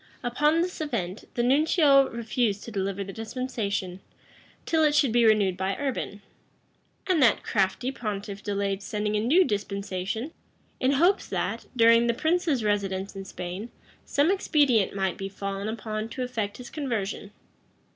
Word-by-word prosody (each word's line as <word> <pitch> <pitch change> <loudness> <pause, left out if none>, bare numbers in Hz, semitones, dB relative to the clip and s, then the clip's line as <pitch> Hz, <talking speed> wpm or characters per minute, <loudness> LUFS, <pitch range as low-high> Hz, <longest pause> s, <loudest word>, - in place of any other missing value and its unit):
Upon 295 +7 +2
this 360 -2 -5
event, 215 - -3
the 240 - +1
nuncio 280 +1 +4
refused 225 -2 -1
to 230 - -8
deliver 195 -1 -2
the 195 0 -8
dispensation, 220 -5 -3 0.7
till 320 -1 +2
it 300 -1 +3
should 285 -5 +4
be 235 0 +4
renewed 205 -4 +3
by 190 +1 -1
Urban; 255 -7 -3 0.8
and 365 -5 +2
that 235 -5 +4
crafty 205 +6 0
pontiff 205 -5 -5
delayed 200 -1 -2
sending 210 0 -2
a - - +2
new 285 - +4
dispensation, 200 - -3 0.5
in 260 +2 +2
hopes 350 +8 +3
that, - - -3
during 230 0 +5
the 235 - +1
prince's 315 -3 +1
residence 195 -2 -1
in 195 0 -6
Spain, 185 +5 -6 0.3
some 290 +5 +2
expedient 285 - +2
might 190 -2 -1
be 195 0 -4
fallen 195 +1 -4
upon 220 0 -4
to 255 - -4
effect 220 -5 -3
his 250 - -10
conversion. 225 -9 -3
220 Hz, 150 wpm, -26 LUFS, 200-270 Hz, 0.8 s, during